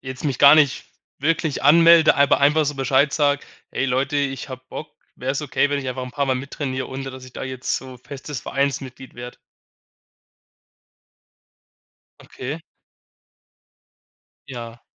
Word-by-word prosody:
jetzt 130 +2 -8
mich 135 -4 -1
gar 140 +1 +9
nicht 150 -3 +3 0.3
wirklich 160 0 0
anmelde. 165 +2 +7
Aber 140 0 +4
einfach 150 +3 +4
so 145 0 -2
bescheid 135 +2 +2
sage: 145 -2 +1 0.3
„Hey, 135 - -1
Leute, 135 +3 0
ich 140 -1 -2
habe 130 0 -8
Bock. 150 - -7 0.3
Wäre 130 +1 -3
es 145 - -3
okay, 145 0 +1
wenn 145 - 0
ich 135 -2 -4
einfach 130 0 -4
'n 125 - -8
paar 140 +1 -1
Mal 130 - +1
mit 135 +2 -6
trainiere 130 -3 -4
ohne, 135 0 -6
dass 130 0 -10
ich 125 - -14
da - - -6
jetzt 130 -1 -3
so 130 -2 -9
festes 140 0 -8
Vereinsmitglied 135 -1 -3
werde?“ 120 0 -9 2.9
Okay. 140 +6 -7 1.9
Ja. 120 -2 -9
135 Hz, 150 wpm, -22 LUFS, 130-145 Hz, 2.9 s, gar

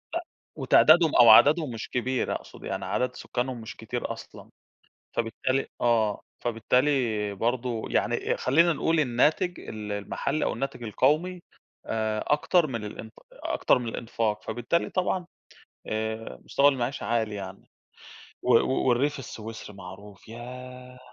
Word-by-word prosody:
أ - - +1 0.4
وتعدادهم 160 0 +5
أو 120 -2 +8
عددهم 145 +5 +7
مش 115 - -6
كبير 125 +1 -1
أقصد - - -10
يعني، - - -4
عدد 125 0 -1
سكانهم 125 -1 -3
مش 110 - -8
كتير 115 +2 -4
أصلًا - - -12 0.7
فبالتالي 130 +4 -1
آه، 115 -3 +2 0.2
فبالتالي 120 -2 +1
برضو 120 +1 -2
يعني - - 0
خلينا 165 +6 +3
نقول 160 0 +1
الناتج 150 +7 +1
ال 105 -1 -7
المحلي 105 +8 -2
أو - - 0
الناتج 135 -3 -4
القومي، 155 - +1 0.4
آآ، 110 -1 -1
أكتر 155 +3 +3
من 115 -5 -4
الإنت 110 +1 -8 0.2
أكتر - - +1
من 120 - -5
الإنفاق 110 -2 -2
فبالتالي 120 +9 -1
طبعًا 185 -1 -1 0.6
آآ، 110 +1 -4
مستوى 140 +1 +4
المعيشة 130 -2 -1
عالي 110 -1 0
يعني. 95 -1 -8 0.7
و 125 -1 +3
و 130 0 0
والريف 140 +4 +2
السويسري 110 -4 -8
معروف 95 +2 -12
ياه! 125 +2 -10
120 Hz, 130 wpm, -27 LUFS, 110-135 Hz, 0.7 s, أو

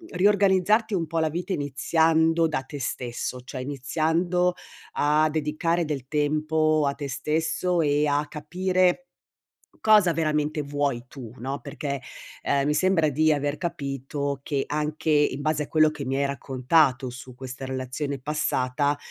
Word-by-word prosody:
riorganizzarti 205 +2 +3
un 165 -2 0
po' 165 0 -1
la 160 -1 +1
vita 175 +4 -3
iniziando 160 +3 +2
da 135 -4 -2
te 145 +2 -8
stesso, 125 0 -4
cioè 130 +1 -7
iniziando 160 +6 0 0.4
a 150 +1 +3
dedicare 160 +2 0
del 135 -4 -4
tempo 155 +1 +1
a 140 - 0
te 145 -2 -5
stesso 160 +5 0
e 145 0 +2
a 145 +1 +1
capire 180 - 0 0.8
cosa 210 -5 +5
veramente 150 -1 0
vuoi 140 -4 -2
tu, 125 -5 -10
no. 135 +3 -4
Perché, 140 -2 -4 0.4
ehm, 140 0 +1
mi 150 - +2
sembra 165 -1 +3
di 155 +3 +3
aver 145 0 -1
capito 140 -3 -3
che, 140 -3 -1
anche 150 +1 -2
in 145 -2 +3
base 155 0 0
a - - -9
quello 155 -1 +4
che 145 - -6
mi 135 +1 -1
hai 140 - +1
raccontato 135 -1 +1
su 125 +1 -10
questa 130 +1 -8
relazione 130 +2 -4
passata, 145 -1 0
150 Hz, 150 wpm, -25 LUFS, 140-160 Hz, 0.8 s, cosa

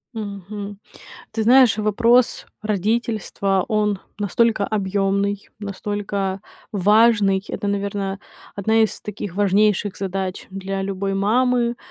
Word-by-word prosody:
Мгм. 205 -1 -6 0.5
Ты 220 0 -2
знаешь, 245 -2 +6
вопрос 230 +4 +3
родительства, 210 -2 0
он 210 -2 +1 0.2
настолько 215 +1 +2
объёмный, 200 0 -1
настолько 200 -1 -3 0.3
важный. 205 0 +4
Это, 205 - -3
наверное, 200 -1 -2 0.4
одна 220 +3 +3
из 220 - -1
таких 205 -3 -6
важнейших 205 0 +2
задач 190 -1 -4
для 195 0 -4
любой 195 0 -2
мамы, 240 +4 +2
205 Hz, 100 wpm, -21 LUFS, 195-215 Hz, 0.5 s, знаешь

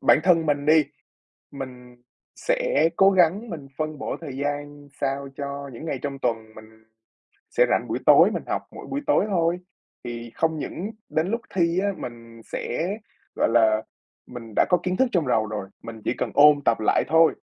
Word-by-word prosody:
bản - - +5
thân 165 -3 +3
mình 145 0 0
đi, 155 0 +6 0.7
mình 125 -3 -9 0.4
sẽ - - +1
cố 195 0 +6
gắng 190 +5 +3
mình 155 -7 -7
phân 155 -1 -3
bổ - - -3
thời 135 -5 -7
gian 145 0 -4
sao 140 +1 -1
cho 140 0 -5
những 120 - -8
ngày 160 - -3
trong 140 -1 -4
tuần 115 -3 -2
mình 110 0 -15 0.7
sẽ - - +4
rảnh - - +1
buổi - - -1
tối, - - +7
mình - - -3
học - - -1
mỗi - - -10
buổi 280 - -3
tối 290 - +3
thôi. 170 -2 +1 0.5
Thì 120 -1 -6
không 160 -1 0
những 195 +9 -5 0.2
đến 160 +3 0
lúc 230 +1 -1
thi 170 -1 +2
á, 200 +1 +1
mình 115 -1 -9
sẽ, 160 +8 -3 0.5
gọi - - +2
là 110 -2 +4 0.4
mình 115 -3 -9
đã - - +4
có 180 - +5
kiến 185 0 -1
thức 260 - +4
trong 165 -8 +1
đầu 110 -3 +2
rồi, 105 -2 -5 0.2
mình 115 -1 -9
chỉ - - +1
cần - - -2
ôn 145 0 +7
tập 115 - +3
lại 110 - +2
thôi. 160 0 +5
145 Hz, 190 wpm, -24 LUFS, 120-170 Hz, 0.7 s, tối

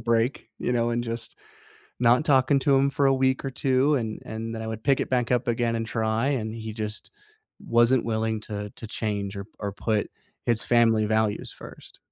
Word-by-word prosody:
break, 115 +3 0
you 125 - -1
know, 120 0 +1
and 120 0 0
just 115 0 -6 0.6
not 125 +4 +4
talking 135 -1 +4
to 140 0 +3
him 135 +1 +3
for 140 0 +1
a 135 - +5
week 130 0 +1
or - - -1
2, 135 +3 +2
and 110 -4 -3
and 115 +1 -5
then 110 - -5
I 110 - -5
would 110 0 -5
pick 140 -2 +3
it - - -2
back 125 -1 +1
up 125 0 +1
again 115 0 +1
and 115 0 -2
try, 110 +2 0
and 110 -6 -1
he 110 -1 -6
just 105 -1 -5 0.5
wasn't 120 - +3
willing 110 -1 -1
to 105 -1 -5
to 115 - -8
change, 100 -3 -3
or 100 - -5
or 100 -1 -3
put 105 +1 -1 0.4
his 115 -2 +2
family 115 -2 +4
values 110 0 0
1st. - - -12
115 Hz, 205 wpm, -26 LUFS, 110-130 Hz, 0.6 s, a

